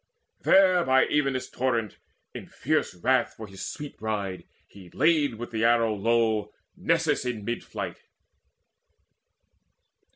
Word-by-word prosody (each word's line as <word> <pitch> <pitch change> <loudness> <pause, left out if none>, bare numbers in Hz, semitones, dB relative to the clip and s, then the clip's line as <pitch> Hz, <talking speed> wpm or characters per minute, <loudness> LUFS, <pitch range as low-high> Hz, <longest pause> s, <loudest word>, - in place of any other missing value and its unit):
There 185 -2 +5
by 130 -2 +4
Evenus' 135 -3 0
torrent, 120 -5 -2 0.3
in - - -8
fierce - - -1
wrath 125 +7 +1
For 110 - -8
his 95 -1 -9
sweet 150 -2 -7
bride, 100 -5 -3 0.2
he 95 -3 -15
laid 150 - +2
with 120 +2 -7
the 110 -1 -1
arrow 115 -1 +3
low 110 0 +1 0.2
Nessus - - +1
in 120 -5 -4
mid 120 +2 -3
flight. - - -6
115 Hz, 125 wpm, -26 LUFS, 105-130 Hz, 0.3 s, There